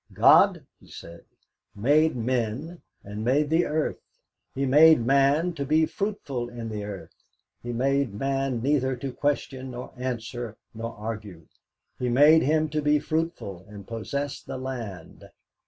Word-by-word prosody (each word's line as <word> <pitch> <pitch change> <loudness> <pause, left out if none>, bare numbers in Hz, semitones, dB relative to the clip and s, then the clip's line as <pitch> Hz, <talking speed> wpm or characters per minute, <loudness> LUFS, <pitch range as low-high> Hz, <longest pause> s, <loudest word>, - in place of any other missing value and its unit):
God - - +5
he - - -20
said 85 0 -12 0.5
made 145 +9 +3
men, 125 +7 -2 0.2
and 105 +2 -6
made 145 +5 +1
the 165 +2 +3
earth; 155 0 -1 0.6
He 135 +1 0
made 150 -1 +6
man 140 +6 +3
to 140 - -4
be 155 +3 +3
fruitful 145 - -4
in 120 -2 -7
the 105 -1 -4
earth; 100 -2 -8 0.5
He 120 - -5
made 135 +1 +1
man 135 0 -1
neither 130 -2 +1
to 130 +1 -6
question 135 -2 -2
nor 125 0 -8
answer 120 -2 -5 0.2
nor 115 +1 -6
argue; 105 -6 -7 0.5
He 125 - -1
made 150 +6 +6
him 155 +2 +2
to 150 +1 -1
be 150 0 +3
fruitful 155 - -3
and 100 -2 -11
possess 140 +5 -4
the - - -7
land. 120 -10 -7
130 Hz, 145 wpm, -26 LUFS, 115-145 Hz, 0.6 s, made